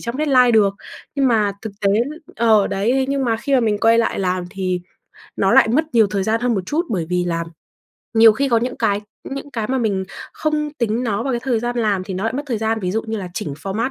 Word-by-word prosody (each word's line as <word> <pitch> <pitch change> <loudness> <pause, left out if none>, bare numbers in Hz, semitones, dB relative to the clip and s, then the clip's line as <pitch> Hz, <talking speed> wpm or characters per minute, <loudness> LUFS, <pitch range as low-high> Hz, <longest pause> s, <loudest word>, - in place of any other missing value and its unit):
trong 235 +2 -4
deadline 265 -5 +4
được." 205 -4 +3 0.4
Nhưng 275 -2 +2
mà 215 -3 +2
thực 220 -3 -6
tế - - +4 0.5
ờ, 220 -3 +4
đấy, 235 +7 0
nhưng 275 -1 0
mà 225 -2 +1
khi 275 +4 -1
mà 255 - +4
mình 215 -3 +1
quay 230 +1 +4
lại 230 - 0
làm 185 -1 -1
thì 185 -2 -2 0.6
nó - - +2
lại - - +6
mất 270 +8 +2
nhiều 225 -3 +5
thời 200 -1 -2
gian 225 +3 0
hơn 245 -1 +1
một 195 - 0
chút. 325 - -1
Bởi 180 -8 -1
vì 180 0 +1
làm 170 -1 -2 0.7
nhiều 225 0 +7
khi 275 +5 0
có 235 - +3
những 250 +2 -3
cái 205 -3 +1 0.3
những 275 +1 -6
cái 225 -5 -3
mà 265 0 0
mình 200 -5 0 0.3
không 305 -1 -1
tính 230 0 0
nó 215 -1 -1
vào 270 - -2
cái 240 - -1
thời 240 -3 0
gian 240 0 -3
làm 205 -5 0
thì 190 - -5
nó 190 +4 -3
lại 225 - 0
mất 280 +3 -3
thời 240 -5 -2
gian, 220 0 -1
ví 180 - -2
dụ 220 +4 -1
như 220 0 -4
là 185 -2 -5
chỉnh 145 -5 -4
format 220 +6 -2
225 Hz, 255 wpm, -20 LUFS, 200-250 Hz, 0.7 s, nhiều